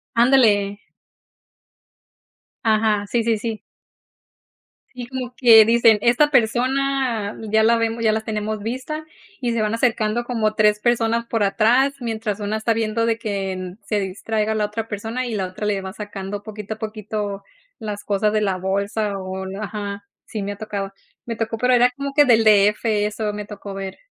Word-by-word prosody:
Ándale. 220 -5 +4 1.9
Ajá, 215 -2 +2
sí, 230 +2 0
sí, 225 -1 +1
sí. 220 0 -4 1.3
Sí, 250 -1 -6
como 255 -1 -5
que 230 -3 +8
dicen, 230 -1 +5
esta 245 +6 +3
persona 250 -2 +1 0.2
ya 220 0 +4
la 230 +1 +4
vem 230 0 -1
ya 220 - +3
las 220 0 -1
tenemos 215 0 -3
vista, 260 +7 -4 0.4
y 240 -1 0
se 230 - 0
van 215 0 0
acercando 230 -1 +1
como 220 -3 -1
3 210 -1 +3
personas 235 0 +1
por 225 -3 0
atrás, 235 +8 +3
mientras 220 -3 -3
una 210 +1 -2
está 220 +1 +1
viendo 225 0 0
de 230 -1 +1
que 200 -4 -2
en 185 +2 -6
se 210 - -1
distraiga 215 +3 -2
la 210 -1 +1
otra 220 +2 -4
persona 225 +4 -4
y 230 - -3
la 190 -2 -1
otra 185 +3 -6
le 200 -2 0
va 190 +1 -7
sacando 205 -1 -6
poquito 215 0 -6
a - - -21
poquito 215 -2 -4 0.4
las 205 -1 -5
cosas 210 +1 0
de 215 - +2
la 195 -3 0
bolsa 200 +2 -1
o 190 0 -5
la 195 +3 -6
ajá, 200 -1 -5 0.2
sí 215 - -5
me 200 +1 -3
ha - - -11
tocado. 200 -2 -4 0.3
Me 230 - -4
tocó, 225 0 -3
pero 250 +2 +2
era 245 +1 +5
como 280 +1 -4
que 290 0 +5
del 225 -3 +5
de 210 -2 +6
efe 210 -1 -1
eso 210 0 -2
me 210 0 -5
tocó 205 -1 -8
ver. 195 -1 -6
215 Hz, 180 wpm, -21 LUFS, 205-230 Hz, 1.9 s, que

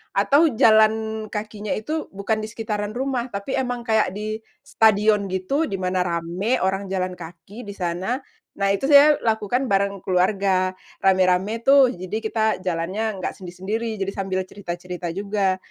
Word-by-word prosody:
atau 295 +4 +4
jalan 220 0 +3
kakinya 210 -1 -5
itu, 310 +9 -3
bukan 215 +2 -1
di - - -4
sekitaran 210 -2 -3
rumah, 260 -1 -2
tapi 200 +6 -3
emang 245 -2 -3
kayak 220 -3 +2
di 215 +1 -4 0.2
stadion 210 -2 +3
gitu, 275 - 0
di - - -3
mana 185 0 -1
rame, 175 +7 -1
orang 195 +1 -1
jalan 185 -1 -1
kaki 175 +7 -11
di - - -5
sana. 185 +7 -2 0.3
Nah, 195 0 0
itu 200 +7 0
saya 290 +1 +7
lakukan 225 +3 0
bareng 200 -2 +1
keluarga. 185 0 +1 0.2
Rame-rame 190 +3 +3
tuh, 275 -1 +7
jadi 185 +2 -5
kita 220 -2 0
jalannya 185 +4 -2
nggak 185 - -3
sendiri-sendiri. 200 +5 -4
Jadi 195 0 -3
sambil 190 -1 -2
cerita-cerita 180 -2 -6
juga 195 +1 -1
200 Hz, 150 wpm, -23 LUFS, 185-220 Hz, 0.3 s, saya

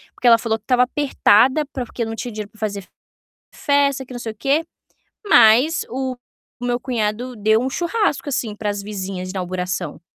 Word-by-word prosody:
porque - - -8
ela 230 -1 +8
falou 225 -1 -1
que 215 - -34
tava 250 +1 +4
apertada 260 0 +3
para 255 -3 -4
porque 235 - -4
não 225 0 -5
tinha 240 +2 -5
dinheiro 210 -1 -6
para 215 - -21
fazer 200 -3 -3 0.7
festa, 280 -2 +1
que 255 - -11
não 245 - -6
sei 225 -2 -5
o - - -22
que, 280 +8 +1 0.6
mas 250 - +5
o 260 0 -3 0.4
meu 245 0 -1
cunhado 240 0 -2
deu 220 +1 +2
um 260 - -1
churrasco, 345 +1 -1
assim, 240 -6 -2
para 210 -1 -2
as 205 0 -3
vizinhas 190 -3 -5
de - - -6
inauguração. 180 -3 -3
235 Hz, 190 wpm, -20 LUFS, 210-260 Hz, 0.7 s, ela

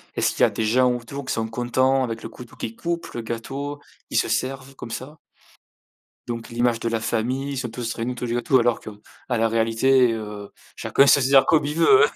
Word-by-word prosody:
Est-ce - - +2
qu'il - - -5
y - - +7
a - - +6
des 110 - -3
gens 125 +3 +3
autour 125 +4 -6
qui - - -3
sont 115 0 -1
contents 130 +3 +1
avec 115 -2 -4
le - - -4
couteau 125 +2 -12
qui 115 -2 -5
coupe 170 +5 -3
le 120 - -4
gâteau? 135 +6 -5 0.3
Qui - - 0
se - - +2
servent 135 +1 -2
comme 120 -3 -9
ça? 140 +7 -7 1.1
Donc 115 0 -5
l'image 120 -1 +1
de 115 - -2
la 115 -1 0
famille, 125 +5 -1
ils - - -4
sont 125 -2 -3
tous 115 0 -4
réunis 120 +2 -3
autour 125 0 -5
du 115 - -2
gâteau 130 +3 +3
alors 120 0 +2
qu'à - - -9 0.4
la 115 -2 +2
réalité, 115 +3 +3
heu, 105 -2 -6 0.3
chacun 140 - +3
se 140 0 +6
sert 135 +1 +5
comme 155 -2 +3
il 150 - -3
veut, 415 - +6
hein. - - -2
120 Hz, 225 wpm, -23 LUFS, 115-135 Hz, 1.1 s, y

